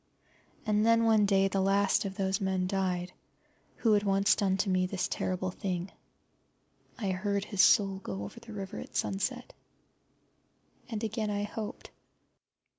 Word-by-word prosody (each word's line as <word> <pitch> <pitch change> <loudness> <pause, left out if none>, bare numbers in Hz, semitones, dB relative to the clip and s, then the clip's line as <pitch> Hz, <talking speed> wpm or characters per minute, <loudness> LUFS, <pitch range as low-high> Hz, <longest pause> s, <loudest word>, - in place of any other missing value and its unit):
And 210 -1 +2
then 230 0 +4
one 220 -2 +4
day 195 -1 +4
the 195 0 0
last 195 +2 +2
of 195 -1 -4
those 190 0 0
men 190 -1 0
died 185 -1 -1 0.6
who 225 - +1
once 195 0 +2
had - - +3
done 195 -2 +2
to 200 0 0
me 185 0 +2
this 180 -1 -2
terrible 185 0 -2
thing. 180 0 -4 1.1
I 200 -5 -1
heard 200 +2 -1
his 200 -3 +1
soul 195 +1 +5
go 100 - -5
over 100 - -8
the 235 -1 -12
river 200 -1 -6
at - - -10
sunset. 245 +6 -2 1.4
And 225 -2 -4
again 220 -1 -2
I 205 0 -1
hoped. 210 +1 -6
195 Hz, 155 wpm, -30 LUFS, 190-210 Hz, 1.4 s, soul